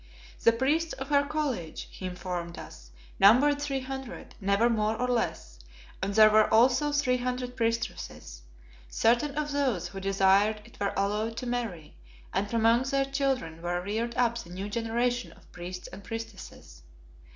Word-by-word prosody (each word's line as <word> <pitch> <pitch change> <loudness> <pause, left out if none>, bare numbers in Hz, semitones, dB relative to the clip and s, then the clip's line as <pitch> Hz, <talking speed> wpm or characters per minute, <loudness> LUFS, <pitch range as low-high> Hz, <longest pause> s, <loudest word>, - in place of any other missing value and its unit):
The 230 - +7
priests 290 +8 0
of 265 +1 -7
her 285 -1 +3
College, 285 - -3
he 185 - -6
informed 180 -1 -5
us, - - -11 0.3
numbered 285 +8 +6
three 275 -2 -2
hundred, 265 -1 -7
never 200 +4 +3
more 220 -2 +1
nor 250 - 0
less, 230 - -2 0.4
and 195 +1 -2
there 215 -1 +8
were 215 0 +4
also 255 +6 +4
three 280 -4 +2
hundred 250 0 -3
priestesses. 230 - -3 0.5
Certain 240 - +2
of 300 -1 -1
those 270 -10 0
who 195 - -7
desired 195 +2 +3
it 235 - -17
were 200 -1 -1
allowed 210 +3 -1
to 250 - -4
marry, 230 -10 -4 0.4
and 205 - -1
from 230 0 0
among 230 +2 +5
their 275 0 +2
children 270 - -2
were 175 +1 -1
reared 220 +5 -3
up 235 -1 +1
the 170 - -10
new 190 +3 -5
generation 235 +2 -1
of - - -22
priests 180 +1 -7
and 195 +1 -11
priestesses. 225 -2 -8
230 Hz, 160 wpm, -28 LUFS, 195-255 Hz, 0.5 s, there